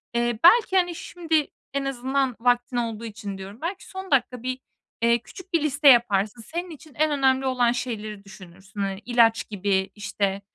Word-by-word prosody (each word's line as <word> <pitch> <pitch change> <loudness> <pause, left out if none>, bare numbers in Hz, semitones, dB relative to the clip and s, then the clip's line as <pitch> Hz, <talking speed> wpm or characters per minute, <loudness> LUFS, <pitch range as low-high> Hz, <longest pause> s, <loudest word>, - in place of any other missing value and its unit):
Eee, 240 -1 0
belki, 385 +1 +6
hani, 355 -2 +1
şimdi 320 -3 -1 0.3
en 280 0 -1
azından 265 -1 -1
vaktin 245 +1 +1
olduğu 230 -1 -3
için 205 -3 -7
diyorum. 195 +3 -10
Belki 365 +4 -4
son 380 -2 -8
dakika 250 -2 +1
bir, 255 0 -3 0.4
eee, 235 0 +4
küçük 375 - -14
bir 335 - +3
liste 290 0 +2
yaparsın. 230 -3 +4
Senin 345 +9 -5
için 310 -2 -13
en 310 0 +1
önemli 265 -2 +2
olan 250 -2 +2
şeyleri 215 -4 -5
düşünürsün. 190 +1 -13
Hani 195 -1 -2
ilaç 230 -2 +3
gibi 195 -1 0
işte, 200 -1 -2
245 Hz, 170 wpm, -24 LUFS, 210-285 Hz, 0.4 s, belki